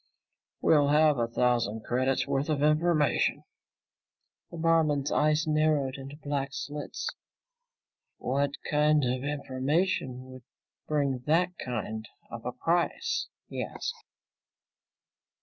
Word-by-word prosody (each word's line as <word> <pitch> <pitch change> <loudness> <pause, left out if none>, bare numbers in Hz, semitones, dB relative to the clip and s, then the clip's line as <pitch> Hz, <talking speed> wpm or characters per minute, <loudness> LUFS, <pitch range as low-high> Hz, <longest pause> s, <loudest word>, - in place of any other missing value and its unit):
"We'll 145 -3 +4
have 150 -1 +4
a 115 - +1
thousand 115 -2 +1
credits 130 +2 +1
worth 140 +3 -1
of 145 -2 +1
information." 155 0 +2 1.1
The 170 - -9
barman's 160 -4 +2
eyes 155 +1 +2
narrowed 155 -3 +2
into 135 +1 -8
black 145 -2 -3
slits. 145 0 -5 1.1
"What 140 +3 0 0.2
kind 150 0 +3
of 125 +1 -1
information 140 0 -1
would 130 -1 -11 0.4
bring 140 -4 0
that 175 +4 +2
kind 110 -3 -4 0.2
of 115 -1 -7
a - - -1
price?" 165 +7 0 0.2
he - - -3
asked. - - -4
145 Hz, 110 wpm, -29 LUFS, 130-155 Hz, 1.1 s, We'll